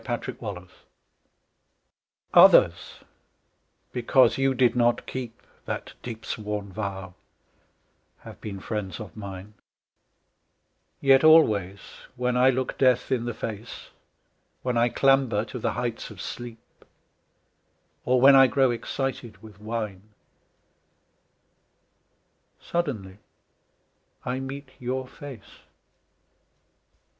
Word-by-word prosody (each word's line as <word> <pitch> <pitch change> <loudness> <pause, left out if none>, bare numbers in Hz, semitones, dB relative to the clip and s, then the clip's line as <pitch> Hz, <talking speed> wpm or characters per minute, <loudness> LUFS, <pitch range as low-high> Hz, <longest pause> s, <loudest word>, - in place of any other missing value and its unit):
A 120 -1 -2
DEEP 130 - -7
SWORN 105 -4 -5
VOW - - -26 1.6
Others - - +6 1.0
because 130 +2 +3
you 135 0 +2
did 125 -1 +3
not 120 -1 +2
keep 120 -3 -6 0.3
That - - -5
deep 115 -2 -8
sworn 105 -2 -5
vow 95 -3 -5 1.1
have - - -12
been 100 -2 -6
friends 95 -3 -5
of 110 - -9
mine; 100 -1 -9 1.5
Yet 135 0 +5
always 105 - +4 0.3
when 125 0 -1
I 125 +1 +5
look 130 0 -2
death 125 -2 +2
in 120 -3 0
the 120 -2 -4
face, 110 +1 -7 0.7
When 125 -1 -1
I 120 +1 +3
clamber 130 -5 +2
to 125 - -7
the - - -1
heights 120 -2 -4
of 105 -4 -12
sleep, 120 0 -9 1.2
Or 125 0 +2
when 135 +2 +8
I 135 0 +8
grow 130 0 +2
excited 120 -3 -4
with 105 -2 -14
wine, 105 -3 -4 2.6
Suddenly 110 - -4 1.1
I 125 +1 -2
meet 135 +1 -7
your 130 +1 -3
face. 130 -6 -12
120 Hz, 105 wpm, -25 LUFS, 105-130 Hz, 2.6 s, when